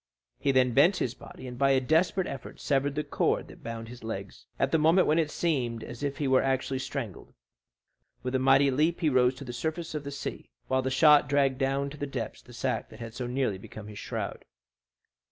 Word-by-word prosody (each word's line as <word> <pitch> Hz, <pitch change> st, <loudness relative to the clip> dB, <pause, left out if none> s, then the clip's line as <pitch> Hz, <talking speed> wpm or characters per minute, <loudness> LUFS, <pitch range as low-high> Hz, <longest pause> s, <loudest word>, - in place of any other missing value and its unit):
He 140 Hz, -, +2 dB
then 130 Hz, -2 st, +3 dB
bent 170 Hz, -, +5 dB
his 120 Hz, -, -1 dB
body, 130 Hz, -, -12 dB
and 125 Hz, -1 st, -7 dB
by 135 Hz, 0 st, +4 dB
a 135 Hz, -, +4 dB
desperate 165 Hz, +7 st, +2 dB
effort 135 Hz, -2 st, -7 dB
severed 140 Hz, 0 st, 0 dB
the 150 Hz, -, -1 dB
cord 145 Hz, -, 0 dB
that -, -, -14 dB
bound 115 Hz, 0 st, -6 dB
his 120 Hz, 0 st, -11 dB
legs, 100 Hz, -3 st, -6 dB
at 135 Hz, -, +1 dB
the 160 Hz, -, +3 dB
moment 165 Hz, +4 st, +5 dB
when 155 Hz, +2 st, +3 dB
it 155 Hz, -2 st, +1 dB
seemed 125 Hz, -10 st, -1 dB
as 120 Hz, -, -8 dB
if 140 Hz, -1 st, -2 dB
he 145 Hz, -, -1 dB
were 130 Hz, -1 st, +4 dB
actually 135 Hz, 0 st, 0 dB
strangled. 125 Hz, -, -6 dB, 0.9 s
With 125 Hz, 0 st, -3 dB
a 130 Hz, -, +2 dB
mighty 135 Hz, +1 st, +5 dB
leap 155 Hz, +6 st, +1 dB
he 160 Hz, -, +3 dB
rose 125 Hz, -1 st, +3 dB
to 140 Hz, -, -9 dB
the 120 Hz, -, -6 dB
surface 160 Hz, +6 st, -3 dB
of 150 Hz, -2 st, -3 dB
the 140 Hz, -, -5 dB
sea, 140 Hz, -, -6 dB, 0.2 s
while 130 Hz, 0 st, +2 dB
the 130 Hz, -, -1 dB
shot 150 Hz, +2 st, +6 dB
dragged 135 Hz, -2 st, +2 dB
down 135 Hz, +1 st, 0 dB
to 150 Hz, -, -9 dB
the 145 Hz, -, -3 dB
depths 125 Hz, -5 st, -5 dB
the 125 Hz, -, -16 dB
sack 125 Hz, +2 st, -2 dB
that -, -, -13 dB
had 115 Hz, -1 st, -7 dB
so 125 Hz, 0 st, -4 dB
nearly 125 Hz, -6 st, -1 dB
become 105 Hz, +2 st, -10 dB
his 105 Hz, -, -9 dB
shroud. -, -, -4 dB
135 Hz, 225 wpm, -28 LUFS, 125-145 Hz, 0.9 s, shot